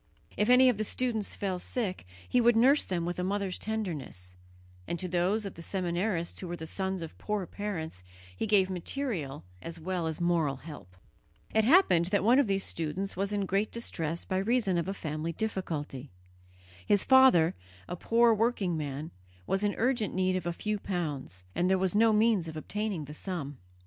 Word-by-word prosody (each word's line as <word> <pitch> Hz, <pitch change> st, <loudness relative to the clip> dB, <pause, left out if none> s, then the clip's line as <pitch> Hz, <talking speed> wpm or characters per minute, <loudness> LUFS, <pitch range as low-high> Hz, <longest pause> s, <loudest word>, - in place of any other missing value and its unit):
If 210 Hz, +3 st, +1 dB
any 255 Hz, +1 st, +7 dB
of 245 Hz, -4 st, +3 dB
the 215 Hz, -, 0 dB
students 225 Hz, -2 st, -1 dB
fell 190 Hz, -3 st, -2 dB
sick, 185 Hz, -, -3 dB, 0.2 s
he 250 Hz, -, +3 dB
would 240 Hz, 0 st, +5 dB
nurse 265 Hz, +6 st, +5 dB
them 175 Hz, -3 st, -2 dB
with 175 Hz, +1 st, -3 dB
a -, -, 0 dB
mother's 195 Hz, 0 st, -1 dB
tenderness; 155 Hz, -, -4 dB, 0.5 s
and 170 Hz, -, -2 dB
to 185 Hz, -, -3 dB
those 185 Hz, +5 st, +1 dB
of 195 Hz, -, -5 dB
the 170 Hz, -, -10 dB
seminarists 175 Hz, 0 st, -1 dB
who 185 Hz, -, -6 dB
were 175 Hz, -, -4 dB
the 160 Hz, -1 st, -7 dB
sons 190 Hz, +1 st, -2 dB
of 160 Hz, -, -9 dB
poor 210 Hz, -3 st, -2 dB
parents 175 Hz, -, -5 dB, 0.3 s
he 90 Hz, -, -2 dB
gave 200 Hz, -3 st, +4 dB
material 180 Hz, -, -3 dB, 0.2 s
as 165 Hz, 0 st, -6 dB
well 175 Hz, 0 st, -2 dB
as 160 Hz, +1 st, -2 dB
moral 170 Hz, -5 st, +1 dB
help. 135 Hz, -, -11 dB, 0.6 s
It 220 Hz, -1 st, +3 dB
happened 230 Hz, -, +5 dB
that 200 Hz, +1 st, +1 dB
one 240 Hz, +5 st, +5 dB
of 280 Hz, -, +3 dB
these 195 Hz, -1 st, +1 dB
students 170 Hz, +5 st, -3 dB
was 195 Hz, +2 st, -1 dB
in 205 Hz, -1 st, 0 dB
great 195 Hz, +3 st, 0 dB
distress 170 Hz, -8 st, -3 dB
by 185 Hz, -, -1 dB
reason 200 Hz, -3 st, +1 dB
of 170 Hz, -, -3 dB
a 195 Hz, -, -1 dB
family 155 Hz, -1 st, -4 dB
difficulty. 155 Hz, -, -4 dB, 0.7 s
His 205 Hz, -2 st, +3 dB
father, 260 Hz, -12 st, +6 dB, 0.3 s
a -, -, -4 dB
poor 230 Hz, +5 st, +4 dB
working 215 Hz, -5 st, +1 dB
man, 150 Hz, 0 st, -4 dB, 0.3 s
was 195 Hz, -, 0 dB
in 205 Hz, -1 st, +1 dB
urgent 240 Hz, -4 st, 0 dB
need 185 Hz, 0 st, +1 dB
of 180 Hz, -2 st, -2 dB
a -, -, +1 dB
few 210 Hz, +4 st, -2 dB
pounds, 150 Hz, -, -4 dB
and 180 Hz, -, +1 dB
there 190 Hz, -, +4 dB
was 185 Hz, -1 st, +1 dB
no 225 Hz, +2 st, +5 dB
means 215 Hz, -5 st, +3 dB
of 160 Hz, -1 st, -6 dB
obtaining 205 Hz, -1 st, -3 dB
the 150 Hz, -, -9 dB
sum. 150 Hz, -5 st, -5 dB
185 Hz, 190 wpm, -30 LUFS, 165-215 Hz, 0.7 s, any